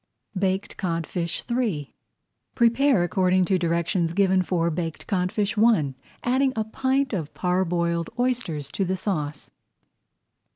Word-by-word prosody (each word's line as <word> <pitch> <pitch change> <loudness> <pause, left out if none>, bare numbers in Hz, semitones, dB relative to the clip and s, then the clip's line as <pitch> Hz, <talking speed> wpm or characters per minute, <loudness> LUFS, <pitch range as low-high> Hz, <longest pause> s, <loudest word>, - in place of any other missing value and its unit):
BAKED 190 +1 -1
CODFISH 170 -2 -2
III 210 - -1 0.6
Prepare 235 -2 +4
according 185 +1 +2
to 185 0 +1
directions 170 0 0
given 190 0 +3
for 170 -2 0
Baked 165 -1 -4
Codfish 195 +2 0
I, 210 - +4 0.3
adding 260 +2 +2
a 220 - 0
pint 265 +4 0
of 160 -6 -3
parboiled 170 -2 0
oysters 235 - -1
to 195 - -1
the 190 0 -1
sauce. 150 -7 -3
185 Hz, 120 wpm, -25 LUFS, 170-220 Hz, 0.6 s, Prepare